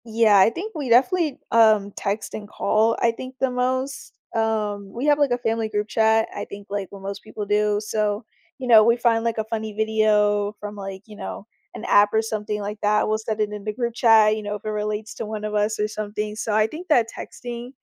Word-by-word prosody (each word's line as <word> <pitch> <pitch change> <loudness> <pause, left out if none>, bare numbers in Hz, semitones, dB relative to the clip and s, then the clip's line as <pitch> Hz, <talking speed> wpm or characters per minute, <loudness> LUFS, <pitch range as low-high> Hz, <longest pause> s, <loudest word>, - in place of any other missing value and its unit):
Yeah, 220 -2 +4
I 190 - +6
think 385 - -6
we 290 -6 -4
definitely, 300 +5 +3
um, 215 -3 +4
text 200 +1 -3
and 210 -1 -6
call, 220 +2 +1
I 235 - +4
think 255 +3 -9
the 265 -1 +1
most, 255 +2 -2 0.2
um 210 -3 -1
we 245 +4 -3
have, 295 0 +4
like, 285 -3 +2
a 245 - +2
family 225 -2 -1
group 210 0 -2
chat, 220 0 +3
I - - -4
think, 200 0 -10
like, 200 -1 -3
what 200 - -10
most 200 0 -5
people 210 - -6
do. 210 0 +1
So, 210 0 -1 0.4
you 255 - -5
know, 225 -3 +8
we 235 +2 +4
find, 230 -1 +2
like, 230 -1 -1
a 220 - 0
funny 220 0 -4
video 210 -1 +2
from, 210 0 -7
like, 195 -1 -7
you 215 - -13
know, 200 0 -7 0.3
an - - -7
app 205 0 +5
or 220 - +3
something 210 -1 -3
like 205 +1 -5
that, 210 0 +2
we'll 215 - +1
set 220 0 -4
it 210 -1 +1
in 210 -1 -7
the 215 0 -3
group 235 +1 -2
chat, 220 -2 +5
you 215 - -5
know, 205 0 -3
if 205 - -10
it - - -2
relates 210 0 -3
to - - -5
one 215 0 -5
of 210 - -4
us 210 +1 0
or 210 - +1
something. 210 0 -4
So 220 0 -3
I 215 0 +4
think 330 +8 -9
that 245 -8 +4
texting, 240 0 -7
215 Hz, 235 wpm, -23 LUFS, 210-230 Hz, 0.4 s, know